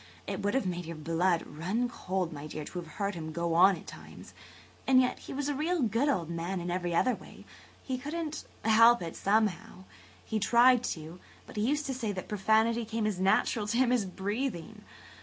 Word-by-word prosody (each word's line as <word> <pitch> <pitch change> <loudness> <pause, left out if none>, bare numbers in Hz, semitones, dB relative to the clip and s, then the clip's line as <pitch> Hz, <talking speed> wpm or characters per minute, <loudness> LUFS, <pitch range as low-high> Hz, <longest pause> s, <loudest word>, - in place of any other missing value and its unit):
It - - -4
would 205 +3 0
have 270 - +1
made 175 -2 -3
your 165 - -5
blood 165 +3 +1
run 185 +11 -2
cold, 185 -7 -3
my 145 0 -7
dear, 155 0 -6
to 180 - -6
have 165 -3 -10
heard 200 +4 -2
him 160 -2 -6
go 170 +1 -1
on 185 +3 +6
at 160 - -12
times. - - -12 0.5
And 260 -1 +6
yet 250 -1 +1
he - - -10
was 285 +1 -2
a 290 - 0
real 315 +2 0
good 235 +6 +1
old 175 - 0
man 170 +1 -3
every 175 -1 -1
other 255 +8 +3
way. - - -12 0.4
He 260 -2 -3
couldn't 310 +2 -4 0.2
help 230 -1 +6
it 165 - -6
someway. 210 0 +2 0.7
He 220 - -1
tried 240 +4 +5
to, 160 -1 -5 0.3
but - - -13
he 210 - -1
used 295 +1 0
to 270 - -2
say 235 -5 -2
that 185 - -6
profanity 220 +3 +2
came 225 0 -2
as 210 -4 -1
natural 205 +3 +2
to 230 +2 0
him 255 -1 +3
as 245 -5 +2
breathing. 200 - -4
205 Hz, 205 wpm, -30 LUFS, 175-245 Hz, 0.7 s, on